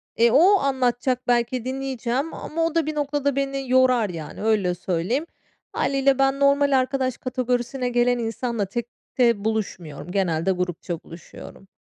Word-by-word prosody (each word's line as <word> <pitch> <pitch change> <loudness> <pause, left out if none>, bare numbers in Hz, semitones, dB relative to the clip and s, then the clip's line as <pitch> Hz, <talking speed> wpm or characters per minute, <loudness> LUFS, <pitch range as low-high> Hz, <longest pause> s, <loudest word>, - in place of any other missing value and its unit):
E, 235 +1 +4
o 370 +9 +6
anlatacak 255 -2 0
belki 240 0 +1
dinleyeceğim 265 +2 -2
ama 330 +1 -2
o 330 0 -2
da 330 -2 +2
bir 310 0 -3
noktada 285 -1 -1
beni 275 -1 -2
yorar, 255 -4 +4
yani, 165 +2 -7
öyle 205 -5 +1
söyleyeyim. 185 - -1 0.5
Hâliyle 275 -1 +1
ben 270 0 +2
normal 280 -1 +4
arkadaş 255 -1 -1
kategorisine 250 0 -2
gelen 245 0 +2
insanla 230 -1 -2
tekte 235 0 -1
buluşmuyorum. 180 -8 -3
Genelde 180 -2 0
grupça 180 -2 -3
buluşuyorum. 170 +3 -12
245 Hz, 135 wpm, -23 LUFS, 210-270 Hz, 0.5 s, o